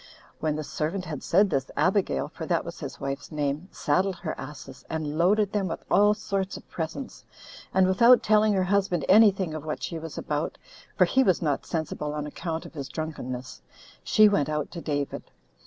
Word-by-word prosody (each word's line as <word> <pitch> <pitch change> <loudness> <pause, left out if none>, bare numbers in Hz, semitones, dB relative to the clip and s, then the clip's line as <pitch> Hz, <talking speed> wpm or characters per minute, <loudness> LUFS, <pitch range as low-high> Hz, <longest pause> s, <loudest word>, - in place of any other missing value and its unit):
When 155 -1 0
the 155 - -3
servant 165 +6 -3
had 150 -5 -5
said 195 +2 +3
this, 135 -2 0
Abigail, 185 +6 +1
for - - -8
that - - +1
was - - -7
his - - -7
wife's 135 +3 -5
name, 150 +2 -2
saddled 185 +6 +1
her 175 -2 -4
asses, 135 -1 -9
and 155 -2 -3
loaded 200 +5 +3
them 200 -3 0
with 165 - -5
all 205 +1 +5
sorts 195 -2 -3
of - - -14
presents; 165 - -5 0.5
and, 190 0 +4
without 235 +7 +6
telling 215 0 +4
her 190 -1 +2
husband 185 -4 +1
any 215 +2 +8
thing 190 -4 -3
of 155 -2 -5
what 155 -1 -4
she 165 - -3
was 160 -1 -8
about, 150 +1 -2 0.4
[for - - +6
he 265 - +3
was 185 -9 +2
not 145 -3 -1
sensible 155 -2 -3
on 150 -1 -3
account 160 +2 -4
of - - -11
his 140 -4 -6
drunkenness,] 130 - -5 0.4
she 215 0 +6
went 175 -9 +2 0.2
to 170 - -7
David. 145 -3 -3
165 Hz, 190 wpm, -26 LUFS, 150-195 Hz, 0.5 s, any